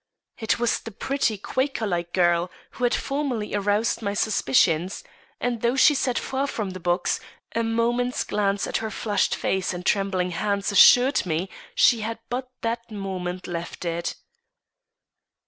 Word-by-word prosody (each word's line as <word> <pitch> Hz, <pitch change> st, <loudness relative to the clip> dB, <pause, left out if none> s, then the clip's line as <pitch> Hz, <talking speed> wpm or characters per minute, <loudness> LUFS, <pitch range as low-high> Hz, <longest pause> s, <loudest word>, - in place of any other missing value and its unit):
It 220 Hz, -2 st, +1 dB
was 240 Hz, -1 st, +1 dB
the -, -, -8 dB
pretty, 225 Hz, 0 st, -1 dB
Quaker 260 Hz, +3 st, -1 dB
like 175 Hz, -3 st, -2 dB
girl 175 Hz, -1 st, +2 dB, 0.2 s
who 250 Hz, -, -2 dB
had 240 Hz, -, +2 dB
formerly 275 Hz, -7 st, -2 dB
aroused 205 Hz, +3 st, +1 dB
my 200 Hz, -1 st, -2 dB
suspicions; 175 Hz, -, +2 dB, 0.4 s
and 240 Hz, -1 st, -2 dB
though 235 Hz, +2 st, +2 dB
she 295 Hz, +3 st, +6 dB
sat 260 Hz, -3 st, 0 dB
far 270 Hz, +1 st, -1 dB
from 215 Hz, -7 st, -3 dB
the 185 Hz, -, -7 dB
box, 175 Hz, +1 st, 0 dB, 0.4 s
a 230 Hz, -, +2 dB
moment's 235 Hz, +2 st, 0 dB
glance 200 Hz, -1 st, 0 dB
at -, -, -1 dB
her 220 Hz, -, -3 dB
flushed 210 Hz, 0 st, 0 dB
face 190 Hz, -1 st, -1 dB
and 175 Hz, 0 st, -7 dB
trembling 195 Hz, -3 st, +1 dB
hands 200 Hz, +3 st, -1 dB
assured 245 Hz, +6 st, +6 dB
me 170 Hz, +3 st, -2 dB, 0.2 s
she 375 Hz, -, +5 dB
had 225 Hz, +1 st, -3 dB
but 255 Hz, +1 st, -3 dB
that 230 Hz, 0 st, -3 dB
moment 185 Hz, -3 st, -4 dB
left 175 Hz, 0 st, -5 dB
it. 170 Hz, 0 st, -2 dB
210 Hz, 155 wpm, -24 LUFS, 185-240 Hz, 0.4 s, she